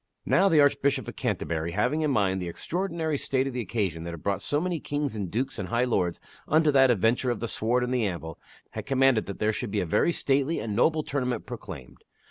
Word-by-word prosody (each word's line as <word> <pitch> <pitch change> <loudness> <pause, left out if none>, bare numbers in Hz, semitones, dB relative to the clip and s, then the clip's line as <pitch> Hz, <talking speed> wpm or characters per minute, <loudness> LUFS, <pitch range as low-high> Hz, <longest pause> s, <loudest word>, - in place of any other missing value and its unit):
Now 195 - +4
the 160 -4 +4
Archbishop 140 -2 +2
of - - -7
Canterbury, 85 0 -2
having 125 +9 +1
in 155 - +1
mind 95 -7 +1
the 90 - -4
extraordinary 165 - -2
state 130 -1 0
of 135 - -3
the 125 - -2
occasion 95 -6 -2
that 85 - -5
had 85 -2 -8
brought 100 -1 -1
so 145 - 0
many 175 0 -2
kings 145 -4 -3
and 100 -4 -3
dukes 130 +5 -2
and 95 - -4
high 120 +1 +1
lords 90 -9 0 0.3
unto 155 0 +4
that 135 -2 +5
adventure 120 +3 +2
of 120 -3 -1
the 115 - -3
sword 120 +3 0
and 125 +1 -1
the 125 -2 +1
anvil, 80 -3 -6 0.3
had - - -6
commanded 135 -4 +3
that 100 - -5
there 105 0 +1
should 120 +1 -3
be 100 - -1
a 95 - 0
very 85 - +2
stately 140 0 +1
and 105 -2 -3
noble 155 +6 +3
tournament 125 -6 -2
proclaimed. 95 - -9
125 Hz, 230 wpm, -27 LUFS, 100-140 Hz, 0.3 s, that